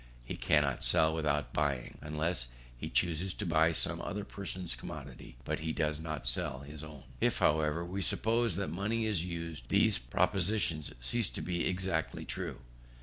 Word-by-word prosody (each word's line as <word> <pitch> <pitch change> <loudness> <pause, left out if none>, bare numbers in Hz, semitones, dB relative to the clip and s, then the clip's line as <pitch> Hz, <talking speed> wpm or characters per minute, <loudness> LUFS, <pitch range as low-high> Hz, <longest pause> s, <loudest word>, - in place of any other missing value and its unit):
He - - -4
cannot - - +2
sell 80 0 +4
without 75 -3 0
buying. 70 -4 -1
Unless 75 -2 0 0.3
he 75 +6 -5
chooses 85 +3 +1
to 105 - -3
buy 80 -1 +4
some 80 - +4
other 105 0 -3
person's 95 -3 -4
commodity, 70 -4 -8 0.2
he 80 0 -2
does 75 -1 0
not 75 -5 -4
sell 65 +1 0
his 75 +2 -9
own. 75 -3 -9 0.2
If, - - +2
however, 80 +2 +2
we 95 +3 -3
suppose 115 +3 +2
that 100 +1 -1
money 110 +5 0
is 105 -7 +1
used, 85 -7 -5
these - - +4
propositions 85 - +1
cease 110 - 0
to - - -5
be 85 -1 0
exactly 90 -3 -1
true. - - -4
80 Hz, 160 wpm, -33 LUFS, 75-95 Hz, 0.3 s, sell